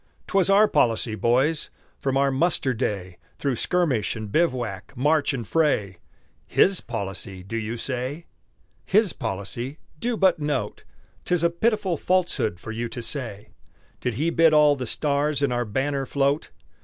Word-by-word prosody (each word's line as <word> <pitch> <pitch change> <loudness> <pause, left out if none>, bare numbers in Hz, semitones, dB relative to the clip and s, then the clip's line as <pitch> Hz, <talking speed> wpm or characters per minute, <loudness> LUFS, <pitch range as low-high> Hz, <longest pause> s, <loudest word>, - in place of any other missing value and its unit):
'Twas 195 -1 +2
our 205 +2 +6
policy, 115 - +1
boys, 125 +9 +1 0.3
from 135 -1 0
our 140 0 +3
muster 135 -2 +1
day, 95 -5 -3 0.2
Through 140 -3 -1
skirmish 150 -13 +1
and 110 -2 -6
bivouac, 120 - -1
march 150 +3 +2
and 120 -6 -4
fray 120 - +1 0.5
"His 190 -1 +3
policy," 95 -3 -5
do 100 +5 -6
you 115 +1 -3
say? 130 +7 -3 0.6
"His 205 -3 +3
policy" 120 +5 -4 0.2
do 240 +3 -1
but 190 -4 +3
note! 145 -2 -2 0.4
'Tis 180 -2 +1
a 170 - +3
pitiful 190 -1 0
falsehood 175 - 0
for 110 - -7
you 115 +1 -3
to 120 - -6
say. 115 -7 -5 0.5
Did 125 -3 -2
he 160 +7 0
bid 165 -2 +5
all 150 -1 +6
the 130 -3 -5
stars 145 +2 0
in 140 - +2
our 120 0 0
banner 135 +5 -1
float? 140 +1 0
135 Hz, 155 wpm, -24 LUFS, 115-160 Hz, 0.6 s, our